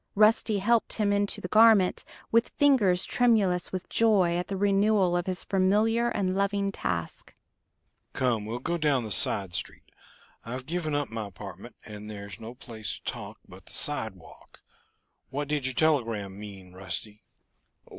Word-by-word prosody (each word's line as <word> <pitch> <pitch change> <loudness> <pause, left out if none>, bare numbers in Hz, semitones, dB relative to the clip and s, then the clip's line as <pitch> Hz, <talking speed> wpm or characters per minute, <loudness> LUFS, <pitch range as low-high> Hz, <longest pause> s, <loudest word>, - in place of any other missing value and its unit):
Rusty 215 0 +4
helped 230 +4 +1
him 205 -2 +1
into 200 0 0
the - - -4
garment, 215 -2 +5 0.3
with 230 +1 +3
fingers 215 -11 +4
tremulous 205 -8 +2
with 185 -1 -5
joy 200 -7 +3
at 175 0 -2
the 195 - -3
renewal 200 -2 +3
of 175 0 0
this 185 -1 -3
familiar 215 +5 +2
and 190 -4 -1
loving 200 0 0
task. 85 - -4 0.8
"Come, 115 -5 0
we'll 115 +2 -3
go 170 +7 -2
down 145 -5 +2
the 110 - -5
side 95 -2 +2
street. 85 - -5 0.6
I've 125 +2 -6
given 155 -2 -2
up 145 -4 -2
my 110 -2 -4
apartment, 95 - -10
and 105 0 -9
there's 100 -1 -8
no 115 +2 -8
place 115 -4 -6
to - - -20
talk - - -6
but - - -15
the - - -10
sidewalk. - - -3 0.7
What 145 +2 -3
did 150 -2 -1
your 130 - -2
telegram 115 -11 0
mean, 95 -3 -10
Rusty?" 95 +3 -6
175 Hz, 155 wpm, -27 LUFS, -, 0.8 s, garment